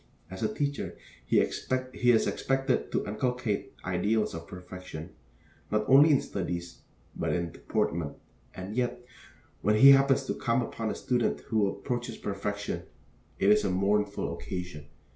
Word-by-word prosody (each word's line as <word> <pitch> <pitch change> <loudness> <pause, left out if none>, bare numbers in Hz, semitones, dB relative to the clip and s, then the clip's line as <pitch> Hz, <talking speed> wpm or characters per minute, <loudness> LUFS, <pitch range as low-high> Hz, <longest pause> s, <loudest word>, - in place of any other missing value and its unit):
As 95 - -7
a 110 -1 +1
teacher, 145 +4 -3 0.3
he - - +4
is 130 -2 +1
expected 135 0 0
to - - 0
inculcate 115 0 -2
ideals 110 +1 +1
of 80 0 -7
perfection, 90 -2 -9 0.6
not 105 0 +1
only 140 +4 +8
in 145 - +4
studies, 85 -2 -4 0.4
but - - -1
in 85 -1 -1
deportment; 80 -3 -2 0.4
and 95 +3 -6
yet, 125 0 -1 0.6
when 105 +2 +3
he 135 +6 +9
happens 135 0 +5
to - - -1
come 120 +1 0
upon 115 -1 -4
a - - -2
student 125 -2 0
who 110 -3 +1
approaches 120 +2 -3
perfection, 100 +1 -3 0.6
it 100 - +4
is 105 0 +5
a 100 - +1
mournful 100 +2 +1
occasion. 90 -5 -6
105 Hz, 145 wpm, -29 LUFS, 95-125 Hz, 0.6 s, he